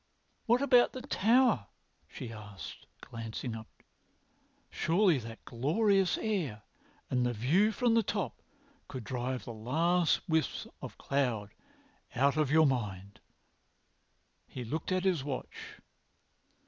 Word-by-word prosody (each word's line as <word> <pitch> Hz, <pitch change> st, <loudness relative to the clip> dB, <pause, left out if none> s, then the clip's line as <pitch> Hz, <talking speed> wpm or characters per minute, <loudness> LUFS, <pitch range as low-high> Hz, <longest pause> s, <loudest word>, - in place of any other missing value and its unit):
"What 240 Hz, +4 st, +4 dB
about 250 Hz, -3 st, +5 dB
the 255 Hz, -, -7 dB
Tower?" 235 Hz, -, +3 dB, 0.4 s
she 115 Hz, -2 st, -7 dB
asked, 105 Hz, -3 st, -10 dB
glancing 115 Hz, +1 st, -6 dB
upwards. 110 Hz, -1 st, -11 dB, 0.8 s
"Surely 175 Hz, -3 st, +3 dB
that 115 Hz, -1 st, -10 dB
glorious 190 Hz, -, +2 dB
air 165 Hz, -, -2 dB, 0.5 s
and 125 Hz, -1 st, +2 dB
the 120 Hz, 0 st, +1 dB
view 160 Hz, -, +3 dB
from 240 Hz, +1 st, +2 dB
the 230 Hz, -, +5 dB
top 200 Hz, -, -3 dB, 0.5 s
would 130 Hz, -, -5 dB
drive 125 Hz, +2 st, -3 dB
the 120 Hz, -, -6 dB
last 160 Hz, +10 st, +1 dB
wisps 160 Hz, -1 st, 0 dB, 0.2 s
of -, -, -8 dB
cloud 120 Hz, -7 st, -1 dB, 0.6 s
out 140 Hz, +3 st, +3 dB
of 155 Hz, -3 st, +1 dB
your 160 Hz, +2 st, +5 dB
mind." 100 Hz, -7 st, -2 dB, 1.3 s
He 125 Hz, -, -7 dB
looked 155 Hz, +9 st, -3 dB
at 185 Hz, 0 st, +1 dB
his 180 Hz, -8 st, +1 dB
watch. 135 Hz, -2 st, -6 dB
140 Hz, 120 wpm, -31 LUFS, 115-190 Hz, 1.3 s, about